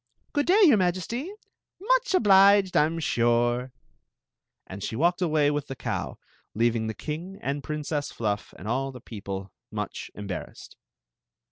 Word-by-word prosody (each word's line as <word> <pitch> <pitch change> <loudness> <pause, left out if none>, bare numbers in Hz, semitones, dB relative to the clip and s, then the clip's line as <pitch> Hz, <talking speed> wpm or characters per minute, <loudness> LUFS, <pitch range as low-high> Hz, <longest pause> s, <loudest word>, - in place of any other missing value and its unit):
"Good 290 -1 +1
day, 405 +4 +5
your 290 - +7
Majesty* 190 - -1 0.5
Much - - +2
obliged, 200 - +5
I 150 - +6
'm 165 +2 -3
sure!" 120 -3 +1 1.0
Aad 95 +1 -8
she 110 - -4
walked 175 +7 +2
away 155 -4 +3
wt^ 145 -1 -2
die 135 - -6
€@w, - - -4 0.4
leaivuig 115 -1 +1
the 110 - -4
king 170 +6 -6
smd 140 +1 -2
WTmeem 150 -1 -3
Fluff 105 -2 -3
and 95 - -9
adl 135 +4 -1
^e 125 - -12
people 100 -3 -6 0.2
much - - -5
osbarrassed. 100 -3 -7
150 Hz, 145 wpm, -26 LUFS, 120-190 Hz, 1.0 s, your